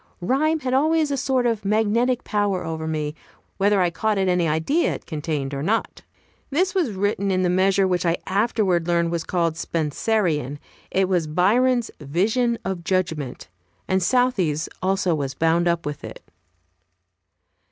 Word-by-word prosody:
Rhyme 300 Hz, -, +1 dB
had 255 Hz, -2 st, -2 dB
always 310 Hz, +2 st, +2 dB
a -, -, +1 dB
sort 260 Hz, -2 st, 0 dB
of 230 Hz, -3 st, 0 dB
magnetic 225 Hz, +4 st, +1 dB
power 205 Hz, -3 st, 0 dB
over 160 Hz, -1 st, -4 dB
me, 150 Hz, -2 st, -2 dB, 0.4 s
whether 205 Hz, 0 st, +3 dB
I 175 Hz, -1 st, +2 dB
caught 215 Hz, +4 st, 0 dB
at 190 Hz, -1 st, +1 dB
any 180 Hz, -2 st, +2 dB
idea 160 Hz, -, +1 dB
it -, -, -10 dB
contained 150 Hz, -3 st, -3 dB
or 140 Hz, -, -3 dB
not. 215 Hz, +9 st, -1 dB, 0.5 s
This 360 Hz, +6 st, +1 dB
was 340 Hz, -, 0 dB
written 200 Hz, 0 st, -1 dB
in 185 Hz, -1 st, +1 dB
the 180 Hz, -, +2 dB
measure 190 Hz, +1 st, +3 dB
which 180 Hz, -1 st, 0 dB
I 170 Hz, -1 st, +1 dB
afterwards 195 Hz, -4 st, +1 dB
learned 170 Hz, -1 st, +1 dB
was 170 Hz, -1 st, -2 dB
called 170 Hz, -2 st, -1 dB
Spenserian. 160 Hz, -, -1 dB, 0.3 s
It 190 Hz, 0 st, +1 dB
was 175 Hz, -4 st, 0 dB
Byron's 235 Hz, +9 st, +2 dB
"Vision 215 Hz, -, 0 dB
of 190 Hz, -3 st, -3 dB
Judgment," 160 Hz, -8 st, -2 dB, 0.4 s
and 190 Hz, 0 st, +1 dB
Southey's 185 Hz, -, +1 dB
also 185 Hz, -1 st, +1 dB
was 140 Hz, -3 st, -3 dB
bound 165 Hz, +3 st, +2 dB
up 170 Hz, -1 st, 0 dB
with 145 Hz, 0 st, -5 dB
it. -, -, -9 dB
185 Hz, 160 wpm, -23 LUFS, 165-225 Hz, 0.5 s, whether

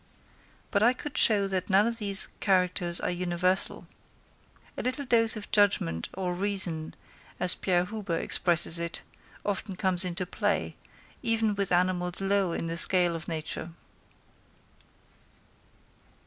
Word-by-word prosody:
But 200 Hz, -, +1 dB
I 240 Hz, +3 st, +4 dB
could 295 Hz, +3 st, -8 dB
show 205 Hz, -3 st, +4 dB
that 185 Hz, 0 st, -3 dB
none 195 Hz, +2 st, +4 dB
of 230 Hz, 0 st, -2 dB
these 200 Hz, -2 st, +1 dB
characters 180 Hz, -3 st, +1 dB
are -, -, -2 dB
universal. 180 Hz, +1 st, -1 dB, 0.9 s
A -, -, -4 dB
little 255 Hz, +3 st, -2 dB
dose 230 Hz, -3 st, +3 dB
of 210 Hz, -2 st, -9 dB
judgment 140 Hz, -, +1 dB
or 180 Hz, -1 st, -3 dB
reason, 180 Hz, -4 st, -1 dB, 0.4 s
as 180 Hz, 0 st, +3 dB
Pierre 180 Hz, -2 st, 0 dB
Huber 200 Hz, -4 st, -4 dB
expresses 170 Hz, -1 st, +1 dB
it, 170 Hz, 0 st, -4 dB, 0.4 s
often 200 Hz, -1 st, -3 dB
comes 185 Hz, -1 st, +4 dB
into 180 Hz, 0 st, 0 dB
play, -, -, -2 dB, 0.5 s
even 225 Hz, -3 st, +1 dB
with 200 Hz, -1 st, -2 dB
animals 180 Hz, 0 st, +2 dB
low 195 Hz, -2 st, 0 dB
in 165 Hz, -, -3 dB
the 165 Hz, 0 st, -3 dB
scale 175 Hz, -2 st, +5 dB
of 165 Hz, -, -8 dB
nature. 160 Hz, 0 st, -5 dB
185 Hz, 135 wpm, -27 LUFS, 175-205 Hz, 0.9 s, scale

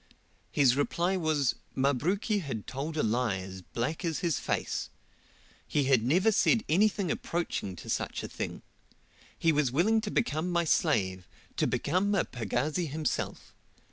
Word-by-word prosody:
His 130 Hz, -4 st, +4 dB
reply 170 Hz, +6 st, +1 dB
was, 155 Hz, -7 st, +1 dB, 0.2 s
Mabruki 175 Hz, -, +1 dB
had 135 Hz, -, -5 dB
told 150 Hz, +4 st, -4 dB
a -, -, +2 dB
lie 115 Hz, -2 st, +1 dB
as 95 Hz, 0 st, -7 dB
black 120 Hz, -, -3 dB
as 165 Hz, -3 st, -1 dB
his 165 Hz, -, +1 dB
face. -, -, -2 dB, 0.8 s
He 145 Hz, -, +1 dB
had 130 Hz, -3 st, +4 dB
never 180 Hz, -, +3 dB
said 225 Hz, +2 st, +3 dB
anything 195 Hz, +1 st, +2 dB
approaching 165 Hz, -, -2 dB
to 75 Hz, -, -11 dB
such -, -, -2 dB
a -, -, -3 dB
thing. -, -, -5 dB, 0.7 s
He 165 Hz, -, +3 dB
was 145 Hz, -4 st, +2 dB
willing 215 Hz, -, +3 dB
to 215 Hz, -, -4 dB
become 180 Hz, -7 st, 0 dB
my 170 Hz, 0 st, +2 dB
slave 95 Hz, -, +1 dB, 0.3 s
to -, -, +2 dB
become 190 Hz, +7 st, +1 dB
a -, -, +2 dB
pagazi 130 Hz, -, -1 dB
himself. 155 Hz, +2 st, -3 dB
155 Hz, 150 wpm, -30 LUFS, 125-180 Hz, 0.8 s, His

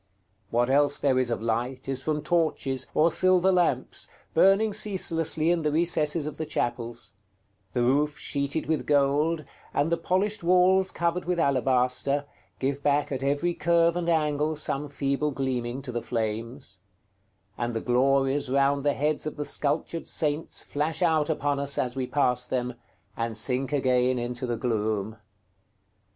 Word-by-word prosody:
What 120 Hz, +1 st, +1 dB
else 145 Hz, +2 st, +2 dB
there 130 Hz, -2 st, +2 dB
is 130 Hz, -2 st, 0 dB
of 115 Hz, -1 st, -2 dB
light 120 Hz, +4 st, -2 dB
is 135 Hz, -1 st, -1 dB
from 150 Hz, +1 st, -2 dB
torches, 150 Hz, -5 st, 0 dB
or 165 Hz, +2 st, +4 dB
silver 185 Hz, +1 st, +3 dB
lamps, 180 Hz, -2 st, +1 dB, 0.3 s
burning 200 Hz, +2 st, +4 dB
ceaselessly 165 Hz, -6 st, +1 dB
in 175 Hz, -1 st, +1 dB
the 150 Hz, -1 st, 0 dB
recesses 155 Hz, -1 st, +1 dB
of 150 Hz, -, -6 dB
the 160 Hz, -, -3 dB
chapels; 120 Hz, -6 st, -3 dB, 0.6 s
the 120 Hz, -, +1 dB
roof 145 Hz, +4 st, +1 dB
sheeted 140 Hz, +2 st, -2 dB
with 160 Hz, -1 st, -1 dB
gold, 150 Hz, +2 st, +2 dB, 0.3 s
and 145 Hz, +3 st, +1 dB
the 170 Hz, -, +2 dB
polished 190 Hz, +4 st, 0 dB
walls 185 Hz, +2 st, +4 dB
covered 170 Hz, 0 st, -1 dB
with 180 Hz, 0 st, -1 dB
alabaster, 135 Hz, 0 st, +1 dB, 0.3 s
give 140 Hz, +1 st, -2 dB
back 145 Hz, 0 st, +1 dB
at 135 Hz, -1 st, -2 dB
every 145 Hz, +6 st, 0 dB
curve 170 Hz, 0 st, +2 dB
and 175 Hz, -1 st, -1 dB
angle 155 Hz, -1 st, +1 dB
some 150 Hz, -1 st, -1 dB
feeble 140 Hz, +1 st, -1 dB
gleaming 130 Hz, -2 st, -3 dB
to 130 Hz, -, -5 dB
the 120 Hz, -1 st, -3 dB
flames; 115 Hz, -2 st, -4 dB, 0.7 s
and 120 Hz, 0 st, -3 dB
the -, -, 0 dB
glories 135 Hz, +3 st, +2 dB
round 140 Hz, +1 st, +2 dB
the 145 Hz, -1 st, +2 dB
heads 150 Hz, +1 st, -1 dB
of 155 Hz, -, -5 dB
the 150 Hz, -, -4 dB
sculptured 155 Hz, +4 st, -1 dB
saints 150 Hz, 0 st, -1 dB
flash 155 Hz, +4 st, -2 dB
out 160 Hz, -3 st, +2 dB
upon 145 Hz, -2 st, 0 dB
us 140 Hz, 0 st, 0 dB
as 125 Hz, 0 st, -1 dB
we 130 Hz, -1 st, -2 dB
pass 125 Hz, -3 st, 0 dB
them, 125 Hz, -1 st, -2 dB, 0.4 s
and 115 Hz, -1 st, -2 dB
sink 130 Hz, +4 st, 0 dB
again 130 Hz, -2 st, +2 dB
into 125 Hz, +1 st, -3 dB
the 120 Hz, -1 st, -2 dB
gloom. 110 Hz, -2 st, -2 dB
140 Hz, 160 wpm, -26 LUFS, 125-160 Hz, 0.7 s, or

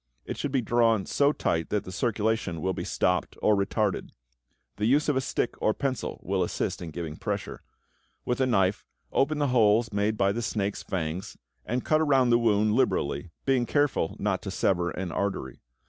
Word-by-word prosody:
It -, -, -4 dB
should 145 Hz, -, -3 dB
be 130 Hz, -3 st, +1 dB
drawn 115 Hz, -3 st, +2 dB
so 140 Hz, 0 st, +3 dB
tight 80 Hz, -, -1 dB
that 105 Hz, -2 st, 0 dB
the 95 Hz, -, -8 dB
circulation 110 Hz, -4 st, -1 dB
will 95 Hz, +3 st, -1 dB
be -, -, -4 dB
stopped -, -, 0 dB
or 105 Hz, -, +3 dB
retarded. 100 Hz, 0 st, 0 dB, 0.7 s
The 105 Hz, +1 st, +1 dB
use 145 Hz, +5 st, +3 dB
of 150 Hz, -, +2 dB
a 130 Hz, -, +2 dB
stick 125 Hz, -, -1 dB
or 110 Hz, -, +2 dB
pencil 135 Hz, -3 st, -3 dB
will 95 Hz, +1 st, 0 dB
assist 90 Hz, -, -2 dB
in 85 Hz, -, -5 dB
giving 80 Hz, -1 st, -6 dB
pressure. -, -, -4 dB, 0.6 s
With 125 Hz, +1 st, -1 dB
a 130 Hz, -, +3 dB
knife, 95 Hz, -5 st, +2 dB, 0.3 s
open 150 Hz, +3 st, +1 dB
the 145 Hz, -2 st, +1 dB
holes 110 Hz, -1 st, +4 dB
made 105 Hz, +1 st, 0 dB
by 100 Hz, -1 st, +3 dB
the 115 Hz, +4 st, -2 dB
snake's 105 Hz, -3 st, -2 dB
fangs 90 Hz, 0 st, -4 dB, 0.3 s
and 125 Hz, +2 st, -2 dB
cut 155 Hz, 0 st, +3 dB
around 135 Hz, -5 st, +3 dB
the 120 Hz, -, +5 dB
wound 105 Hz, -2 st, +3 dB
liberally, 85 Hz, -, 0 dB, 0.2 s
being 130 Hz, -3 st, +2 dB
careful 145 Hz, -, +1 dB
not -, -, -1 dB
to -, -, -5 dB
sever 90 Hz, -2 st, +1 dB
an 90 Hz, 0 st, -4 dB
artery. 95 Hz, -11 st, -3 dB
110 Hz, 190 wpm, -27 LUFS, 95-125 Hz, 0.7 s, the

